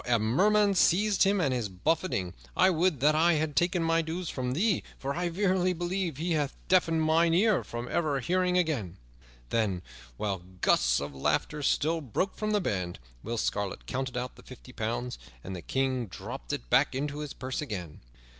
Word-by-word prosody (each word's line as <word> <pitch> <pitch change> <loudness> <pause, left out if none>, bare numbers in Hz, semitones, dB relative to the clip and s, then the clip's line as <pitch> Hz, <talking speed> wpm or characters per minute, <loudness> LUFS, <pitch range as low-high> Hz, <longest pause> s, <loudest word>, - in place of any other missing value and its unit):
A 120 -1 +4
murrain 200 - +3
seize 195 +2 +3
him 200 0 +4
and 140 -7 +1
his 120 -5 -2
buffeting! 95 - -1 0.2
I 190 - +6
would 165 -5 +1
that 150 +2 +5
I 165 +3 +4
had 155 -1 -1
taken 175 +3 +2
my 165 0 +3
dues 165 +2 -4
from 125 -1 -2
thee, 195 - +2 0.2
for 140 +1 -3
I 175 +2 -1
verily 185 0 +1
believe 175 -2 -2
he 170 +3 -2
hath 145 -3 0
deafened 165 -3 +3
mine 165 +1 +3
ear 210 +1 +3
from 120 +1 -6
ever 150 -3 0
hearing 180 +5 +1
again." 135 - -1 0.5
Then, 100 -6 0 0.3
while 100 -4 -2 0.2
gusts - - +3
of 70 0 -5
laughter 75 - -1
still 160 +3 +1
broke 150 - -2
from 215 - -2
the 210 -1 +2
band, 90 - -2 0.2
Will 115 +2 -4
Scarlet 100 -3 -2
counted 130 -1 -3
out 125 +1 -4
the - - -13
fifty 130 0 -13
pounds, 120 +2 -3 0.2
and 95 - -6
the 90 - -6
King 130 0 -1
dropped 65 -7 -7
it - - -4
back - - +4
into 145 +2 -2
his 150 -2 -5
purse 130 +2 -4
again. 90 - -6
150 Hz, 185 wpm, -29 LUFS, 115-175 Hz, 0.5 s, I